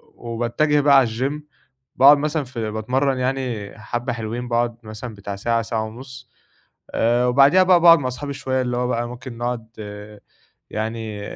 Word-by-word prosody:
وباتّجه 120 +6 0
بقى 140 -1 +6
على 130 - +5
الGym 130 +6 -2 0.6
باقعد 140 +2 +7
مثلًا 150 +1 -1
في 115 -4 -5
باتمرّن 130 +5 0
يعني 125 -5 -3
حبَّة 120 +2 -3
حلوين، 120 +2 -5
باقعد 120 -1 0
مثلًا 110 +2 -8
بتاع 100 0 -6
ساعة، 115 +3 0
ساعة 110 0 -2
ونُص. 125 +2 -11 0.6
آآ 120 +2 +2
وبعديها 140 +9 +5
بقى 185 -1 +5
باقعد 170 -2 +8
ما 130 - -3
أصحابي 140 +3 -5
شوية 130 -1 -2
اللي 125 -1 -2
هو 125 0 0
بقى 120 -1 -1
ممكن 125 -1 -9
نقعد، 120 -2 -3 1.0
يعني 110 -1 -4
125 Hz, 160 wpm, -21 LUFS, 115-135 Hz, 1.0 s, باقعد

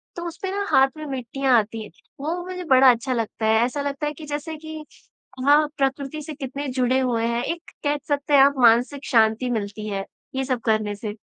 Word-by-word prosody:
तो 345 - -5
उस 335 - -7
पे 380 - -2
ना 400 +1 -2
हाथ 265 0 +6
में 310 - -6
मिट्टियाँ 265 -1 -1
आती 220 0 -1
हैं, 210 - -12 0.3
वो 325 +5 -2
मुझे 365 0 -6
बड़ा 260 0 +7
अच्छा 245 +2 -2
लगता 225 -1 -3
है 220 +1 +4
ऐसा 255 +4 -3
लगता 280 +1 -3
है 295 - -3
कि 305 +1 -10
जैसे 300 +2 -4
कि 315 -1 -7 0.6
हाँ, 295 +2 +5
प्रकृति 275 +2 -1
से 310 +1 -7
कितने 280 0 -5
जुड़े 255 0 +1
हुए 240 -3 0
हैं। 235 +1 -1
एक 340 +4 -5
कह 290 0 +1
सकते 290 0 -1
हैं 280 - +8
आप 280 +1 +5
मानसिक 245 +4 +4
शांति 225 +1 +3
मिलती 215 -1 -3
है 195 -1 -3 0.3
ये 265 - 0
सब 255 -2 -1
करने 215 -2 +1
से। 205 0 -5
265 Hz, 220 wpm, -23 LUFS, 230-295 Hz, 0.6 s, हैं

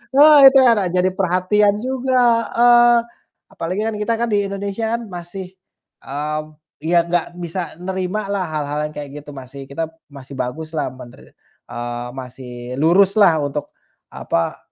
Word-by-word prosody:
Wah, 295 +1 +8
itu 270 - +5
anak 225 -6 +4
jadi 180 +1 +3
perhatian 190 +3 +2
juga 260 0 -1 0.4
heeh, 240 0 +6 0.6
apalagi 185 +1 -3
kan 220 0 -2
kita 230 +2 0
kan 235 +1 -1
di 205 - +3
Indonesia 200 +3 -3
kan 235 - -5
masih, 175 +2 -7 0.6
mmm, 150 +2 -5 0.3
iya 170 +1 +3
nggak 170 0 0 0.2
bisa 170 +1 -5
nerimalah 190 +2 -3
hal-hal 150 -1 -3
yang 150 - -13
kayak 145 -1 -6
gitu, 145 - -14
masih 135 +1 -10
kita 140 +4 -4 0.2
masih 140 -1 -12
baguslah 155 +4 -3
mener 125 -1 -14 0.3
eee, 120 0 -5
masih 125 -1 -8
luruslah 195 +1 +5
untuk, 145 +1 -4 0.4
apa, 85 0 -2
175 Hz, 140 wpm, -19 LUFS, 145-205 Hz, 0.6 s, Wah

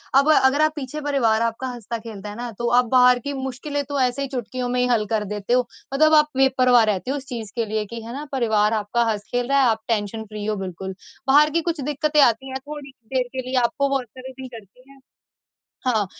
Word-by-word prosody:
अब 280 +3 +5
अगर 265 +2 +4
आप 310 0 +3
पीछे 295 +1 -5
परिवार 245 -7 +1
आपका 230 +3 -1
हँसता-खेलता 230 -3 -6
है 205 - -8
ना, 240 +1 -5
तो 235 +3 -4
आप 245 +1 +4
बाहर 250 -1 +6
की 285 +4 -5
मुश्किलें 270 +2 -3
तो 285 -1 -1
ऐसे 255 +2 0
ही 275 - -1
चुटकियों 250 -1 -4
में 250 0 0
ही - - +3
हल 230 -4 +2
कर 215 -1 +1
देते 210 +3 -2
हो। 250 -1 +2 0.3
मतलब 310 +3 +4
आप 300 -1 +6
बेपरवाह 255 -3 +5
रहते 215 +4 -1
हो 290 - -1
उस 275 - -8
चीज़ 225 -4 -6
के 230 -2 0
लिए 215 0 -2
कि 230 +2 -8
है 230 +1 -7
ना, 285 +3 -5
परिवार 220 -5 +2
आपका 220 +2 0
हँस-खेल 240 +4 -3
रहा 275 0 +4
है, 255 - +4
आप 220 -1 0
टेंशन 220 -1 -1
फ्री 210 -1 -7
हो 215 0 0
बिल्कुल। 190 -1 -6 0.3
बाहर 295 +3 +6
की 335 - +2
कुछ 335 -2 -2
दिक्कतें 295 +2 +1
आती 265 +1 +3
हैं 265 0 -4
थोड़ी 295 -2 -8 0.2
देर 260 -1 +2
के 260 - -2
लिए 260 - -2
आपको 280 +4 +1
वो 275 0 +1
असर 255 +2 -12
ही - - -10
नहीं 260 -1 -7
करती 235 +3 -14
हैं। 275 0 -17 0.9
हाँ, 220 -5 +2
250 Hz, 235 wpm, -22 LUFS, 220-275 Hz, 0.9 s, बाहर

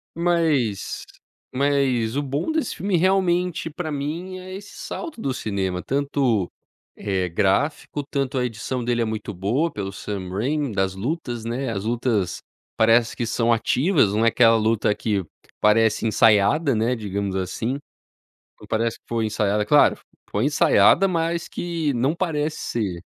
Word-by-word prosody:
Mas 160 - 0 0.5
mas 130 -4 +1
o - - +1
bom 145 - -2
desse 315 -6 -1
filme, 190 0 0
realmente, 180 -2 +1
pra 160 0 -5
mim 165 +6 -4
é 185 0 -9
esse 200 +1 -9
salto 325 -7 -6
do 135 - -1
cinema, 95 -6 -2
tanto, 135 -8 0 0.4
eh, 95 -3 -2
gráfico, 105 - 0
tanto 135 -1 -2
a 125 - +1
edição 125 +2 -4
dele 120 0 0
é 115 - +1
muito 110 -1 -4
boa 115 - 0
pelo 100 -1 -4
Sam 100 -3 -5
Raine 130 +6 -1
das 95 -1 +1
lutas, 120 - -4
né. 125 +4 -2
As 95 - -3
lutas 115 -5 0 0.4
parece 115 +1 +4
que 120 - -2
são 115 +1 +1
ativas, 130 - +2
não 110 +2 +2
é - - +5
aquela 115 0 +5
luta 110 -1 +2
que 105 -4 -1 0.4
parece 110 +1 +3
ensaiada, 115 +7 +4
né, 115 +3 +1
digamos 100 -3 -3
assim, 115 +8 -2 0.8
não - - -12
parece 115 +1 -1
que - - -65
foi 115 -1 -1
ensaiada, 105 -1 0
claro 145 +7 +5 0.3
foi 105 - 0
ensaiada, 150 +6 +4
mas 170 -1 -1
que 165 -5 -2
não 130 +6 +1
parece 155 -4 -1
ser. 95 -7 -3
120 Hz, 155 wpm, -23 LUFS, 105-150 Hz, 0.8 s, é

